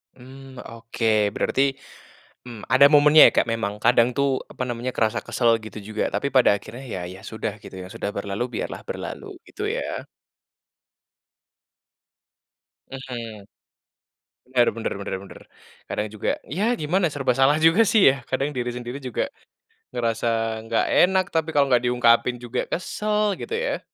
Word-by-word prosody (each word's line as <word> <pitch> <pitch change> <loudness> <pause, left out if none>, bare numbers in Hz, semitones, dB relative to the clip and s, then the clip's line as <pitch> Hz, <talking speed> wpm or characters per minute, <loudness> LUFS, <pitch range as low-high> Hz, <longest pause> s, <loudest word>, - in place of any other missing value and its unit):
Mmm, 130 +1 -13
oke 115 -2 0
berarti, - - 0 0.9
mmm, 115 -3 -9
ada 135 +2 +8
momennya 150 +1 +7
ya - - +5
Kak, - - +3
memang 105 -3 -2
kadang 120 0 +5
tuh, 140 0 +2 0.2
apa - - -6
namanya 120 +1 -4
kerasa 110 +1 +1
kesal 120 -2 +2
gitu 110 - -9
juga 110 0 -2
tapi - - -1
pada 130 -3 +5
akhirnya 120 +5 -8
ya 90 - -4
ya 95 - -12
sudah 110 -1 -4
gitu - - -11
ya, - - -8
sudah 110 -3 -3
berlalu 100 +3 -3
biarlah - - -4
berlalu, - - -6 0.2
gitu - - -9
ya. - - -3 2.8
Mhm. 120 -6 -8 1.0
Benar 125 -2 +2
benar 115 - -2
benar 95 - -4
benar. - - -13 0.5
Kadang 105 - -2
juga, 110 - -2
ya 180 +8 -3
gimana 175 +3 +1
serba 140 -3 0
salah 135 +4 +3
juga 165 +7 +5
sih 220 +1 +3
ya, - - -5
kadang 135 +3 -1
diri 125 -2 -2
sendiri 120 +1 -6
juga, 125 -4 -2 0.7
ngerasa 115 -1 -1 0.4
gak 115 0 +1
enak 185 +1 +4
tapi 160 -1 0
kalau 140 -1 +5
gak 120 0 +3
diungkapin 120 0 +3
juga 120 +1 -4
kesal, 210 +3 -1
gitu 455 - -5
ya. - - -2
125 Hz, 150 wpm, -23 LUFS, 115-140 Hz, 2.8 s, ada